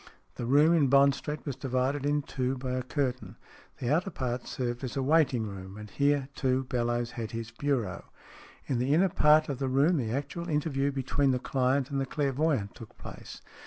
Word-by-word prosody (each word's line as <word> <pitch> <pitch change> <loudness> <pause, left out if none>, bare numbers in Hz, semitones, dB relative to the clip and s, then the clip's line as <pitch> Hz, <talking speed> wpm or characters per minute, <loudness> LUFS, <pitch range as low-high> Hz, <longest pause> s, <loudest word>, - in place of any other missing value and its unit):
The 120 - -5
room 150 +6 +5
in 155 -5 +4
Bond 140 +1 +5
Street 150 +2 -6
was 140 -4 -3
divided 135 +2 -1
in 145 0 +1
two 130 -1 -2
by 130 0 -4
a 130 0 -1
curtain. 130 -1 -3 0.4
The 125 +3 0
outer 175 +5 +1
part 125 -6 -4
served 120 0 -3
as 130 +1 -4
a 135 - 0
waiting 140 -5 +3
room, 95 -1 -8
and 105 -1 -10
here, 140 +2 +1
too, 130 -1 0
Bellowes 120 -1 -1
had 115 -2 -5
his 115 0 -5
bureau. 120 -7 -2 0.6
In 130 -3 -1
the 135 +4 +2
inner 190 +4 +4
part 155 -1 +4
of 140 -4 -4
the 135 -1 -1
room 145 +7 +3
the 120 -5 -1
actual 160 +6 -4
interview 140 -2 0
between 135 +1 0
the 130 - +2
client 130 +1 0
and 135 -1 0
the 135 - -2
clairvoyant 140 -6 0
took 115 -3 -13
place. - - -10
135 Hz, 200 wpm, -29 LUFS, 125-145 Hz, 0.6 s, room